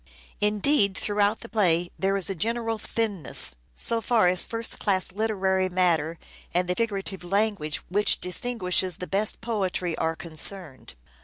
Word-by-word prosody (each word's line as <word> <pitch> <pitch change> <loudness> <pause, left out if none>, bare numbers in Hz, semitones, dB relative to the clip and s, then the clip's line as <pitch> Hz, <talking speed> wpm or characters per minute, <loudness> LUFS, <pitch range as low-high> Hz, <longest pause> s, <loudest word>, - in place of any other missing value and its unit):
Indeed, 210 0 +2
through 205 0 -3
out 205 +2 +2
the - - -8
play 175 -6 +2
there 195 +1 +1
is 190 - +1
a 195 - -1
general 225 +4 -2
thinness, 200 - -1 0.2
so 230 - +3
far 225 -5 +3
as 180 0 +3
first 230 0 -1
class 190 -3 0
literary 190 -2 0
matter 170 -3 +1 0.4
and 180 0 +1
the 180 - +1
figurative 195 -3 -3
language 195 -4 0
which 205 +3 +3
distinguishes 185 -3 -1
the 180 - -5
best 200 +3 0
poetry 190 -7 -2
are 160 0 0
concerned. 160 - 0
195 Hz, 150 wpm, -25 LUFS, 180-215 Hz, 0.4 s, so